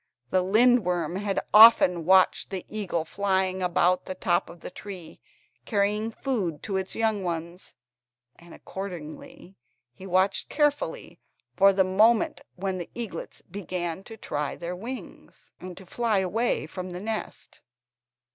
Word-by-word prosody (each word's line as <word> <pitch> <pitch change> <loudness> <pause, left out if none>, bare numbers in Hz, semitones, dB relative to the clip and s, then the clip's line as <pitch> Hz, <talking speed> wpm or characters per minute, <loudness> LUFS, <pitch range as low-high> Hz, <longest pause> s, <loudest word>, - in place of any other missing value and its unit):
The 185 - +3
lindworm 185 -5 +2
had 200 -1 -1
often 210 -6 +8
watched 185 +1 +4
the 190 -2 -5
eagle 190 -6 -3
flying 190 +1 0
about 180 0 +2
the 185 - -5
top 175 -2 0
of 170 0 -13
the - - -8
tree, 180 -6 -9 0.5
carrying 210 +1 0
food 215 - -3
to 200 - -5
his 190 0 -2
young 220 -3 0
ones 170 +1 -5 0.6
and, 170 0 -17
accordingly, 190 - -9 0.4
he 190 +8 -11
watched 185 +2 +1
carefully 295 -1 -1 0.4
for 195 0 +6
the 190 0 +3
moment 215 +5 +3
when 190 0 -3
the 175 - -7
eaglets 235 -4 -7
began 180 -2 -5
to 225 - -10
try 150 -7 -3
their 175 +1 -5
wings 240 +8 -9
and 180 -1 -9
to 190 - -11
fly 225 +2 0
away 195 +2 0
from 185 +3 -7
the 180 0 -6
nest. 215 +2 -6
190 Hz, 140 wpm, -26 LUFS, 180-215 Hz, 0.6 s, often